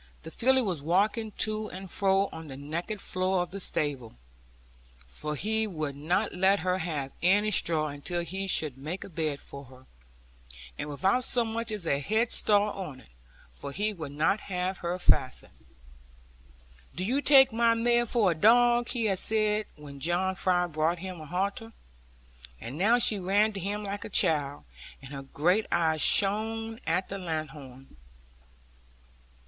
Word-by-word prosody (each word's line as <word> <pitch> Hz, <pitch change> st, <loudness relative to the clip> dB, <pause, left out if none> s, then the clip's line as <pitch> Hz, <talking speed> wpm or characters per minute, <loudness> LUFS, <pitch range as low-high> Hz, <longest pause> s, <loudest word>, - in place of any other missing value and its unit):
The 160 Hz, -, -9 dB
filly 260 Hz, +5 st, +3 dB
was 180 Hz, -9 st, -2 dB
walking 210 Hz, +7 st, +1 dB
to 215 Hz, 0 st, 0 dB
and 190 Hz, 0 st, -8 dB
fro 195 Hz, +2 st, +1 dB
on 160 Hz, 0 st, -9 dB
the 135 Hz, -2 st, -8 dB
naked 170 Hz, +9 st, -5 dB
floor 185 Hz, -1 st, 0 dB
of 175 Hz, -, -10 dB
the 200 Hz, -, -6 dB
stable 140 Hz, -10 st, -2 dB, 0.9 s
(for 150 Hz, -, -6 dB
he 220 Hz, +7 st, 0 dB
would 155 Hz, -7 st, -4 dB
not 175 Hz, +9 st, -1 dB
let 190 Hz, +1 st, +3 dB
her 185 Hz, +1 st, 0 dB
have 150 Hz, -6 st, -3 dB
any 205 Hz, +4 st, +3 dB
straw, 155 Hz, -6 st, +1 dB
until 145 Hz, +5 st, -3 dB
he 190 Hz, +4 st, -4 dB
should 150 Hz, -7 st, 0 dB
make 160 Hz, +7 st, -5 dB
a -, -, -10 dB
bed 155 Hz, -4 st, -2 dB
for 140 Hz, 0 st, -11 dB
her), 130 Hz, 0 st, -17 dB, 0.9 s
and 150 Hz, -, -5 dB
without 190 Hz, -, +1 dB
so 240 Hz, -1 st, +3 dB
much 225 Hz, 0 st, -3 dB
as 210 Hz, -5 st, -3 dB
a 140 Hz, -3 st, +1 dB
headstall 210 Hz, -, +3 dB
on, 150 Hz, -10 st, -7 dB, 0.5 s
for 140 Hz, -, -8 dB
he 210 Hz, +7 st, -1 dB
would 155 Hz, -7 st, -7 dB
not 160 Hz, +8 st, +1 dB
have 185 Hz, -1 st, -3 dB
her 175 Hz, +1 st, -3 dB
fastened. 130 Hz, -7 st, +1 dB, 1.4 s
'Do 185 Hz, -, -2 dB
you 260 Hz, +7 st, 0 dB
take 270 Hz, -4 st, +7 dB
my 230 Hz, 0 st, +3 dB
mare 240 Hz, +1 st, +2 dB
for 215 Hz, -5 st, +2 dB
a -, -, +1 dB
dog?' 240 Hz, +6 st, +4 dB
he 240 Hz, -3 st, -1 dB
had 195 Hz, -3 st, +1 dB
said 215 Hz, -1 st, +1 dB
when 145 Hz, -2 st, -11 dB
John 175 Hz, +5 st, 0 dB
Fry 180 Hz, -1 st, +1 dB
brought 160 Hz, +1 st, 0 dB
him 180 Hz, -1 st, -7 dB
a 155 Hz, -, -10 dB
halter. 200 Hz, +7 st, -3 dB, 0.9 s
And 125 Hz, -, -7 dB
now 210 Hz, +9 st, +3 dB
she 215 Hz, -3 st, +1 dB
ran 205 Hz, +4 st, +2 dB
to 195 Hz, -, -4 dB
him 205 Hz, +3 st, -3 dB
like 200 Hz, 0 st, -5 dB
a -, -, -7 dB
child, 145 Hz, -7 st, +1 dB, 0.4 s
and 135 Hz, +1 st, -11 dB
her 140 Hz, -, -6 dB
great 175 Hz, +10 st, 0 dB
eyes 160 Hz, -2 st, +1 dB
shone 225 Hz, +2 st, +1 dB
at 180 Hz, +4 st, 0 dB
the 195 Hz, -, -5 dB
lanthorn. 145 Hz, -, -7 dB
185 Hz, 165 wpm, -28 LUFS, 155-215 Hz, 1.4 s, take